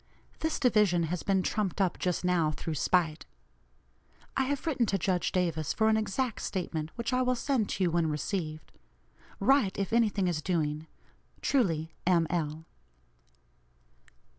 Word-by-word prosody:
This 320 0 -1
division 210 -8 +3
has 180 - -2
been 195 -2 +1
trumped 205 -1 -1
up 190 -3 +1
just 180 0 -1
now 175 -4 +2
through 155 +1 -4
spite. 160 - +1 1.1
I 265 - +2
have 280 0 -2
written 260 -8 +1
to 195 - +1
Judge 180 -1 0
Davis 165 -4 0
for 220 0 +2
an 220 - +4
exact 220 +3 -1
statement, 165 -5 -3
which 235 +1 -3
I 255 - +3
will 255 0 +2
send 245 -4 0
to 190 - -1
you 175 - +2
when 165 -1 +1
received. 155 +1 -3 0.7
Write 270 -8 +3
if 200 +1 -2
any 230 -2 +4
thing 195 -2 -1
is 165 -3 -1
doing. 155 -3 -1 0.6
"Truly, 165 - +1
"M. 170 -3 +4
L." 160 -2 -2
185 Hz, 155 wpm, -30 LUFS, 165-220 Hz, 1.1 s, an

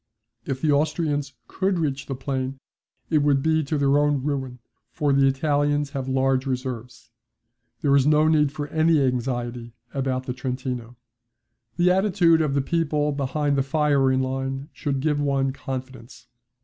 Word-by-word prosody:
If 135 -1 -3
the 155 - +2
Austrians 145 -1 0
could 190 -1 -1
reach 140 -5 -2
the 135 - -3
plain 130 0 -3 0.5
it 155 - +4
would 145 -2 +2
be 160 0 +2
to 150 +2 -1
their 140 0 +3
own 145 -2 +1
ruin, 135 -3 -3 0.3
for 145 -4 0
the 135 0 +4
Italians 145 +1 +1
have 135 -3 -4
large 130 0 +1
reserves. 125 -3 -5 0.7
There 140 -2 +4
is 140 0 +4
no 150 +1 +4
need 150 -3 +3
for 145 0 -5
any 160 0 +3
anxiety 120 -2 -2 0.2
about 130 -1 -2
the 125 - -3
Trentino. 125 -2 -4 0.8
The 180 +1 +4
attitude 180 -4 +3
of 145 -3 0
the 140 - +1
people 150 -2 0
behind 140 +1 -1
the 135 - +2
firing 140 -2 +2
line 135 +2 -3
should 140 -3 -2
give 150 0 +1
one 135 -2 0
confidence. 130 -2 -8
140 Hz, 155 wpm, -24 LUFS, 130-150 Hz, 0.8 s, it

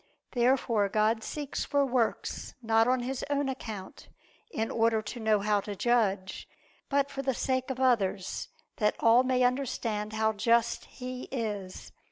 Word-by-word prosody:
Therefore 240 -4 +2
God 215 +2 +2
seeks 290 -2 -4
for 285 -1 +2
works 245 -3 -1
not 225 0 +3
on 255 0 +2
His 255 +1 -3
own 285 -1 +1
account, 220 -7 -7 0.4
in 225 - -2
order 225 -1 +2
to 215 +3 -6
know 215 -2 +2
how 205 0 +2
to 205 0 -6
judge; 200 -4 0 0.4
but 280 0 +1
for 275 -1 -4
the 265 -2 -1
sake 260 +1 -1
of 260 -1 -3
others, 205 -7 +1 0.3
that 210 -2 +2
all 230 +2 +6
may 255 -1 +2
understand 235 -5 -1
how 220 0 +1
just 230 +2 +2
He 255 0 -7
is. 210 -7 -4
230 Hz, 155 wpm, -29 LUFS, 215-255 Hz, 0.4 s, all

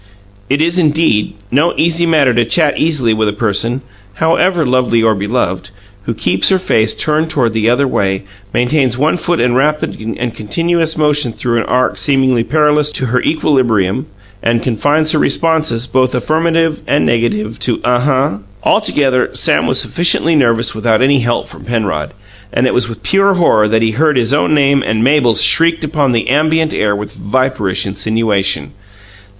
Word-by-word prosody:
It 140 +3 +1
is, 170 +3 +1
indeed, 150 -11 +1 0.2
no 150 +7 +1
easy 170 +1 +1
matter 150 -6 +3
to 120 0 +2
chat 150 +5 +1
easily 145 -8 +1
with 110 0 0
a 105 - -1
person, 115 +4 -2 0.3
however 165 - +1
lovely 125 -3 +1
and 110 -3 +1
beloved, 100 -3 -2 0.4
who 115 - -2
keeps 95 -1 +1
her 190 - +3
face 110 -11 0
turned 155 +1 -1
the 115 -6 0
other 135 +3 +1
way, 95 -6 -1 0.3
maintains 125 0 0
one 150 +5 +1
foot 175 -1 -1
in 120 0 +1
rapid 150 +4 0 0.2
and 120 -1 -3
continuous 165 +8 -2
motion 150 -4 +1
through 120 +1 -2
an - - -2
arc 125 +1 0
seemingly 130 -4 +1
perilous 150 +2 +1
to 130 - -2
her 125 +1 0
equilibrium, 125 - 0 0.3
and 115 0 0
confines 145 +6 0
her 155 - +1
responses, 155 -10 0
both 130 0 0
affirmative 160 +3 0
and 140 +4 +1
negative, 115 -2 -1
to 120 - -1
"Uh 125 0 +2
huh." 135 +1 +1 0.3
Altogether, 130 -3 +1
Sam - - +1
was - - +1
sufficiently 165 -1 +1
nervous 115 -5 +1
without 110 +1 +1
any 140 +1 +3
help 120 -1 -1
from - - -13
Penrod, 100 -10 -3 0.4
and 120 - 0
it 130 - +1
was 120 -1 0
with 110 -1 -9
pure 195 0 +2
horror 110 -12 +3
that 110 +1 +1
he 110 - +1
heard 150 +4 +1
his 120 +1 0
own 150 +1 +2
name 140 -1 +2
and 110 -2 -1
Mabel's 130 -4 +3
shrieked 165 0 +3
upon 150 -3 0
the 115 -1 -1
ambient 155 +2 +1
air 105 -1 0
with 105 +1 -6
viperish 105 -5 -1
insinuation. 100 -6 -1
130 Hz, 170 wpm, -13 LUFS, 115-155 Hz, 0.4 s, matter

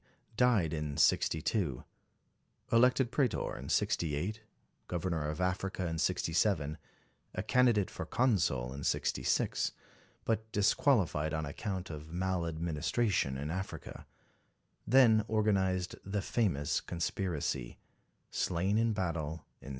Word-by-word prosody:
died 110 -10 +3
in 75 -2 -3
62; 75 - +1 0.9
elected 125 +1 +4
Pretor 130 -6 0
in - - -8
68; 85 +8 0 0.5
GtoTernor 85 -3 -1
of 75 - -4
Africa 90 0 -1
in 80 -1 -2
67; 80 -3 +1 0.6
a - - -2
candidate 120 -6 +3
for - - -6
Consul 80 - +1
in 70 +1 -7
66, - - 0 0.5
but 110 0 -1
disqualified 100 - +2
on 80 0 -2
account 95 +4 -4
of 75 0 -8
maladministration 85 - 0
in 75 +3 -4
Africa; 85 -4 -6 0.8
then 115 -3 +6
organised 95 -4 +1
the 100 0 -2
famous 85 - 0
conspiracy; 85 -7 -3 0.5
slain 95 +5 +1
in 115 -1 +2
battle 85 -5 -3 0.2
in - - -12
68. - - -6
90 Hz, 110 wpm, -32 LUFS, 80-110 Hz, 0.9 s, then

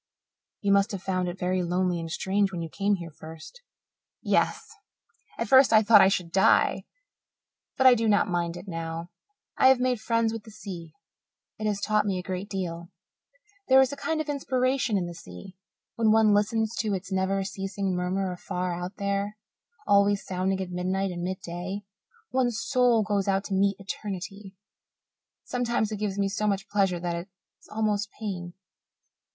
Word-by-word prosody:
"You 200 - +1
must 200 0 +3
have 195 -1 -5
found 185 -1 -1
it 175 - -7
very 185 0 0
lonely 180 0 0
and 165 0 -5
strange 195 +3 0
when 175 -3 -4
you 165 - -6
came 200 +4 +1
here 170 -3 -8
first." 160 - -12 0.6
"Yes. - - +1 0.7
At - - -2
first 265 -1 +6
I 220 -1 +6
thought 215 +1 +7
I - - +7
should 180 -3 -1
die 190 +2 +3 0.9
but 265 - +2
I 260 - +10
do 225 -2 +1
not 205 0 +3
mind 175 -2 -1
it 180 +3 -10
now. 165 -1 -5 0.5
I - - +7
have 260 -1 +6
made 250 -3 0
friends 230 0 +1
with 225 -2 -6
the 225 - -13
sea; 180 -6 -9 0.7
it 215 - -1
has 205 -1 0
taught 210 0 +1
me 190 -2 0
a 180 - -4
great 185 +2 -5
deal. 170 -3 -4 0.8
There 265 0 +7
is 265 +1 +3
a - - -4
kind 315 +3 -2
of 310 - -2
inspiration 260 -5 0
in 180 - -1
the 175 - -6
sea. 165 - -11 0.4
When 225 -2 +3
one 220 -1 +5
listens 220 +2 +1
to 210 -3 0
its 190 +1 -7
never 190 +1 0
ceasing 195 -1 -3
murmur 185 +1 -1
afar 180 0 -3
out 180 +3 -5
there, 200 +1 -2 0.5
always 200 0 +3
sounding 190 +1 -1
at 180 -1 -5
midnight 185 +2 -1
and 175 -1 -5
midday, 185 +2 -5 0.5
one's 245 -3 +1
soul 245 -4 +3
goes 205 -1 -1
out 195 0 +1
to 200 - -5
meet 195 +1 +2
Eternity. 195 0 -6 0.9
Sometimes 235 -3 -1
it 215 - -3
gives 205 -2 -2
me 200 -1 +1
so 205 +2 -1
much 195 -1 -1
pleasure 195 -4 +1
that 175 0 -2
it 170 +3 -6 0.3
is - - -19
almost 210 -1 -1
pain." 180 -5 -5
195 Hz, 180 wpm, -27 LUFS, 180-215 Hz, 0.9 s, I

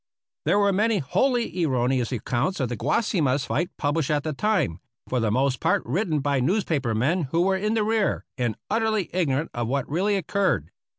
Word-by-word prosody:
There 170 +6 +3
were 200 -1 +3
many 215 +3 +2
wholly 225 - 0
erroneous 125 -3 +1
accounts 125 - -1
of 130 -3 0
the 120 - -2
Guasimas 140 - +1
fight 175 +5 -1
published 145 0 0
at 150 -2 +1
the 155 - -2
time, 175 - 0 0.3
for 125 - 0
the 115 -2 +1
most 130 +2 +1
part - - +1
written 155 - 0
by 140 -1 +1
newspaper 140 - 0
men 150 +9 +1
who 165 +6 +1
were 190 +1 +2
in 210 +3 0
the 220 - +2
rear 220 -1 0
and 120 -4 -1
utterly 220 -3 0
ignorant 160 -4 0
of 120 -1 -2
what 135 +1 -1
really 190 +7 +1
occurred. 185 - 0
155 Hz, 185 wpm, -25 LUFS, 130-200 Hz, 0.3 s, There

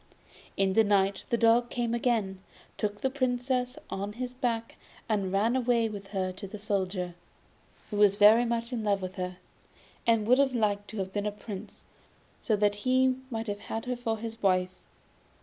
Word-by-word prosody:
In 195 -1 +2
the 225 - +5
night 200 -1 +2
the 235 - +2
dog 230 +1 +4
came 235 -2 -1
again, 225 -6 0 0.4
took 205 -1 -3
the 265 - +1
Princess 250 -1 -1
on 200 +2 -3
his 250 +2 -5
back 235 -3 -2 0.3
and 200 -4 0
ran 215 +5 +2
away 240 -3 +2
with 200 -2 -7
her 190 -2 -2
to 185 +2 -8
the 200 - -8
Soldier, 190 -3 -2 0.8
who 205 - -2
was 205 -1 +5
very 215 +3 +7
much 235 +1 -2
in 230 -3 -2
love 200 -2 +1
with 185 0 -6
her, 180 -1 -4 0.7
and 225 -2 +3
would 250 +4 +5
have 270 -2 +3
liked 205 -3 0
to 220 - -8
have 190 -1 -3
been 205 0 -1
a - - -1
Prince, 205 -1 -9 0.6
so 220 - +1
that 205 0 +2
he 255 +3 +2
might 225 -3 -3
have 205 -2 -4
had 225 +2 -5
her 250 0 -1
for 230 -2 -2
his 225 +1 -7
wife. 185 -1 +2
215 Hz, 185 wpm, -29 LUFS, 200-240 Hz, 0.8 s, very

